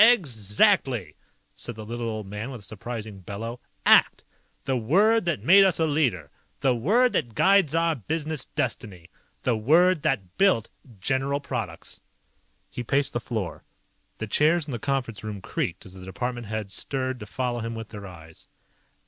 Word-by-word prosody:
"Exactly!" 130 - +3 0.4
said 120 - -6
the 110 0 -8
little 120 +1 -4
old 110 -2 -4
man 105 +5 -5
with 125 -5 -8
a - - -13
surprising 110 0 -6
bellow. 110 +6 -6 0.3
"ACT! - - +5 0.4
The 135 - 0
word 195 - +3
that 170 -3 -1
made 195 +3 +8
us 190 -4 +2
a 160 - +3
leader. 125 - 0 0.3
The 135 -2 +3
word 215 - +3
that 120 -6 -1
guides 190 -6 +4
our 165 0 +3
business 155 - -3
destiny. 105 - -4 0.3
The 125 - +2
word 160 +9 +4
that 95 -12 -2
built 190 - +3 0.3
General 135 +6 0
Products!" 100 - -6 0.7
He - - -5
paced 140 +4 0
the 120 - 0
floor. 110 -5 -4 0.5
The 110 - -4
chairs 155 +8 +2
in - - -5
the 120 - -3
conference 135 -6 -2
room 105 -2 -5
creaked - - -3
as 95 - -12
the 95 -1 -11
department 120 +4 -4
heads 105 -2 -4
stirred 130 -2 -2
to 105 - -8
follow 125 +2 -2
him 115 0 -4
with 115 -1 -7
their 105 -2 -8
eyes. 80 -3 -13
120 Hz, 165 wpm, -26 LUFS, 105-150 Hz, 0.7 s, made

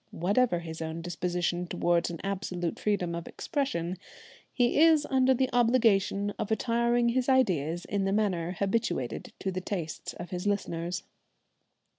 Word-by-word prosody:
Whatever 200 +1 +1
his 160 -1 -7
own 160 +1 -4
disposition 175 0 -1
towards 175 -1 +1
an 170 -2 -6
absolute 185 -3 -3
freedom 190 -5 0
of 170 0 -5
expression, 185 - -2 0.5
he 245 +2 +2
is 320 -2 +6
under 260 0 +4
the 260 +1 +2
obligation 225 -5 +3
of - - -2
attiring 235 +1 +2
his 255 +2 0
ideas 175 - +2
in 200 -1 -1
the 195 - +1
manner 185 -5 0
habituated 200 - -1
to 190 - -3
the 185 0 -3
tastes 175 -5 -4
of 175 0 -8
his 180 +2 -3
listeners. 180 -3 -2
195 Hz, 145 wpm, -29 LUFS, 175-235 Hz, 0.5 s, is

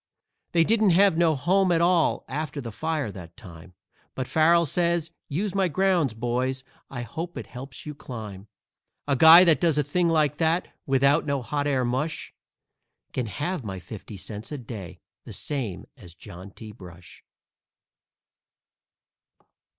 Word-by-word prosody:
They 165 -1 +5
didn't 215 +2 +3
have 195 -3 +5
no 165 -2 +3
home 185 +6 +2
at 165 - +3
all 170 -1 +2
after 150 +1 -4
the 120 -4 -6
fire 155 -1 -2
that 85 -3 -11
time, 90 -1 -13 0.4
But 130 -1 -3
Farrell 170 +2 +4
says, 170 +1 0 0.2
"Use 185 +7 -2
my 195 -1 +2
grounds, 175 - +1
boys; 125 +3 -2 0.3
I 125 -3 -5
hope 165 +7 -6
it - - -5
helps 125 +1 -9
you 150 - -5
climb." 110 -8 -9 0.6
A 140 - +2
guy 160 +6 +9
that 165 -4 +3
does 165 -4 +2
a 150 - +3
thing 170 +5 +1
like 150 -3 +2
that, 165 +2 +1 0.2
without 140 +3 +3
no 140 -3 -1
hot 145 +2 -2
air 130 -3 +1
mush, 140 +6 -3 0.8
Can 125 -3 -2
have 150 - -3
my 95 -3 -5
fifty 100 +3 -10
cents 105 +5 -7
a 150 - -4
day, 110 -7 -9 0.2
the - - -9
same 120 - -4
as 90 -10 -14
John 90 +2 -11
T. 110 +2 -11
Brush! 90 -3 -14
145 Hz, 155 wpm, -25 LUFS, 115-165 Hz, 0.8 s, guy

